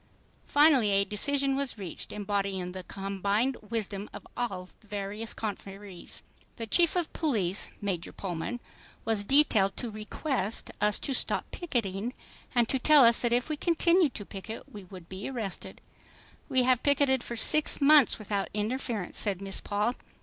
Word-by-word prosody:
Finally 290 -7 +5
a 200 0 +2
decision 275 +7 +1
was 275 -4 -2
reached 185 -5 -7
embodying 200 -3 -2
the 185 0 -7
combined 200 +6 -1
wisdom 210 -3 -3
of - - -10
all 195 -7 -3
the 215 - -22
various 205 +2 -3
conferees. 200 -3 -7 0.3
The 230 - -5
Chief 340 +10 +3
of 350 -3 -2
Police, 210 - 0
Major 185 -4 -3
Pullman, 190 +6 -5 0.4
was 220 -2 +1
detailed 215 -6 +3
to 240 - -3
"request" 215 +1 -3
us 210 0 +3
to 275 - -1
stop - - -1
"picketing" 235 - -3 0.4
and 240 -2 +3
to 265 - +1
tell 295 0 +7
us 230 0 +5
that 240 - +1
if 245 +1 +1
we 310 - -2
continued 340 0 +2
to 205 - -5
picket, 205 +4 -8
we 205 -3 -11
would 180 -2 -12
be 190 +5 -6
arrested._ 225 -8 -4 0.7
"We 260 -1 +3
have 250 -1 +3
picketed 280 -2 +2
for 235 - -6
six 300 +6 +5
months 290 0 +6
without 205 -2 -3
interference," 220 -2 -3
said 200 -4 0
Miss 195 -1 -3
Paul. 210 +4 -1
220 Hz, 155 wpm, -29 LUFS, 195-265 Hz, 0.7 s, tell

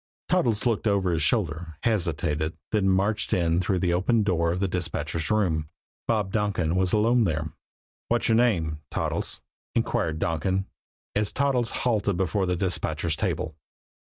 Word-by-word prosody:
Toddles 120 - +2
looked 115 -2 +1
over 100 -3 +2
his 80 -2 0
shoulder, 80 -4 0
hesitated, 80 -7 0
then 100 -3 +2
marched 100 +3 +1
in 85 0 +2
through 95 +1 0
the 90 -1 +1
open 105 +5 +2
door 85 -4 +1
of 90 - -2
the 100 - +1
dispatchers' 85 -3 -2
room. 85 -8 +1 0.4
Bob 105 -4 +1
Donkin 95 -6 0
was 90 -1 +2
alone 115 +3 +4
there. 80 -3 -2 0.5
"What's 120 0 +1
your 115 - +4
name 85 -11 +2
Toddles?" - - -2 0.3
inquired 80 -1 0
Donkin, 95 +5 0 0.5
as 105 0 0
Toddles 130 -4 +1 0.2
halted 105 -6 +1
before 95 +1 0
the 90 - +1
dispatcher's 90 0 -1
table. 80 - -2
95 Hz, 150 wpm, -26 LUFS, 85-105 Hz, 0.5 s, alone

